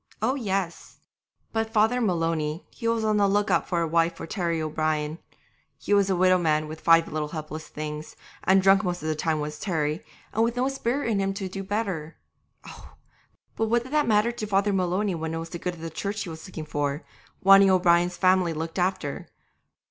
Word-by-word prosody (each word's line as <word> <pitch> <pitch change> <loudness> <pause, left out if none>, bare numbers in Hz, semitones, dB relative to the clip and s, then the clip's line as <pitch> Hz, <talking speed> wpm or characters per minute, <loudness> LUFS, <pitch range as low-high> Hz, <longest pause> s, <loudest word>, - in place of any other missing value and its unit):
Oh, 225 +5 +1
yes! 195 -9 -3 0.6
but 225 0 0
Father 225 +3 +3
Maloney 165 -5 -1
he 230 - -5
was 230 -1 +1
on 215 -1 +2
the 200 -1 +4
look 205 +1 +1
out - - +2
for 175 -2 +1
a 165 - 0
wife 165 +1 +2
for - - -6
Terry 170 -2 -2
O'Brien. 155 0 -1 0.6
He - - -2
was 200 -1 +4
a 190 - +2
widow 185 0 +4
man 155 -2 +1
with 155 +1 -8
five 165 0 +5
little 155 -1 -3
helpless 155 0 -7
things, 150 0 -6 0.3
and 190 0 +4
drunk 195 +1 +5
most 175 -3 -3
of 155 - -2
the 155 - 0
time 155 0 0
was 150 0 -5
Terry, 155 -5 -1 0.3
and 220 - +2
with 235 +1 0
no 250 +1 +1
spirit 270 0 -2
in 205 - +1
him 195 0 -1
to 195 -2 -4
do 195 +1 -6
better. 190 -6 -3 0.5
Oh! - - -12 0.6
but 225 - 0
what 235 +1 +2
did 260 +3 -10
that 300 -3 +2
matter 215 +1 +3
to 220 -3 -5
Father 200 0 +2
Maloney 190 +2 0
when 160 -1 -3
it - - -2
was 165 0 -6
the 170 - -6
good 180 0 -3
of 160 - -13
the 165 0 -5
Church 200 +5 -3
he 180 - -7
was 160 +3 -9
looking 160 -4 -7
for, 145 0 -2 0.4
wanting 195 0 +8
O'Brien's 175 -1 +3
family 185 -2 +3
looked 160 +3 -4
after? 180 -5 -2
180 Hz, 210 wpm, -26 LUFS, 160-205 Hz, 0.6 s, wanting